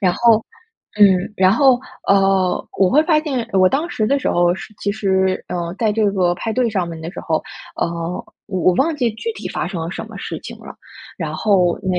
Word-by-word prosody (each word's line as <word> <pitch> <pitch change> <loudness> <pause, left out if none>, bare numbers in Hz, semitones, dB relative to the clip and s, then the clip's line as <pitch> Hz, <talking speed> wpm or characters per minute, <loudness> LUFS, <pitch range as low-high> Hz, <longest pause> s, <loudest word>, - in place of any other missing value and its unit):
然 185 -4 +3
后 230 -2 +4 0.6
嗯， 190 -1 +4
然 185 0 +4
后， 250 +2 +4 0.3
呃， 195 -2 +2
我 190 - +4
会 300 +3 +5
发 315 -2 +3
现 260 -7 -3
我 185 -1 +5
当 295 - -1
时 215 - -1
的 275 - +2
时 270 - -1
候 175 0 +2
是 190 - -10
其 200 - -1
实， 190 -3 0
呃， 170 0 -3
在 220 -2 +2
这 215 -1 +2
个 180 -3 +1
派 220 +5 -4
对 245 +1 +1
上 190 -5 -1
面 165 -1 -7
的 165 +2 -6
时 - - -8
候， 160 -2 -1 0.3
呃， - - 0 0.6
我 190 -3 -3
我 185 - +4
忘 315 - +1
记 245 -5 +1
具 460 - -4
体 - - -7
发 - - -3
生 180 -3 -5
了 165 - -4
什 220 - -6
么 220 - -10
事 - - -5
情 - - -9
了。 - - -10 0.5
然 - - -4
后 185 -5 +2
那 185 -2 0
195 Hz, 240 characters per minute, -19 LUFS, 180-230 Hz, 0.6 s, 会